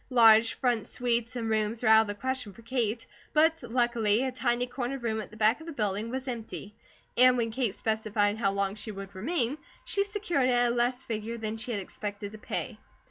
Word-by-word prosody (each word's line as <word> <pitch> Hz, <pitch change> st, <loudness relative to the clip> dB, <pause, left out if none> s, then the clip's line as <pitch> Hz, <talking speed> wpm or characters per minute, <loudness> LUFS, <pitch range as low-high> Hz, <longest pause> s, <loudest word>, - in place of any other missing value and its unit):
Large 225 Hz, -3 st, +6 dB
front 240 Hz, -4 st, 0 dB
suites 240 Hz, -1 st, -1 dB
and 230 Hz, -2 st, -2 dB
rooms 220 Hz, +1 st, 0 dB
were 220 Hz, -, +4 dB
out 220 Hz, 0 st, +8 dB
of 220 Hz, -, -2 dB
the 205 Hz, -, -4 dB
question 255 Hz, -1 st, -3 dB
for 230 Hz, -, -15 dB
Kate, 230 Hz, -2 st, -1 dB, 0.3 s
but 320 Hz, +1 st, +4 dB
luckily 240 Hz, -2 st, +1 dB
a 265 Hz, -, -1 dB
tiny 245 Hz, -1 st, 0 dB
corner 250 Hz, +1 st, -3 dB
room 225 Hz, -3 st, -2 dB
at -, -, -9 dB
the 215 Hz, -, -13 dB
back 220 Hz, +4 st, +3 dB
of 320 Hz, -, -11 dB
the 330 Hz, -, -5 dB
building 210 Hz, -2 st, -1 dB
was 260 Hz, +2 st, -4 dB
empty 225 Hz, -4 st, -6 dB, 0.4 s
and 250 Hz, 0 st, +6 dB
when 230 Hz, -1 st, 0 dB
Kate 230 Hz, -4 st, -1 dB
specified 215 Hz, -1 st, 0 dB
how 195 Hz, -4 st, +2 dB
long 200 Hz, 0 st, -1 dB
she 215 Hz, +1 st, -7 dB
would 195 Hz, -1 st, -8 dB
remain, 255 Hz, -, -1 dB, 0.3 s
she 400 Hz, -, +1 dB
secured 385 Hz, -10 st, 0 dB
it -, -, +3 dB
at 245 Hz, 0 st, +3 dB
a -, -, -2 dB
less 245 Hz, +2 st, +1 dB
figure 225 Hz, +1 st, -4 dB
than 220 Hz, -1 st, -3 dB
she 225 Hz, +2 st, -6 dB
had 220 Hz, -4 st, -1 dB
expected 205 Hz, +1 st, -6 dB
to 215 Hz, -, -10 dB
pay. -, -, -4 dB
230 Hz, 220 wpm, -29 LUFS, 215-250 Hz, 0.4 s, out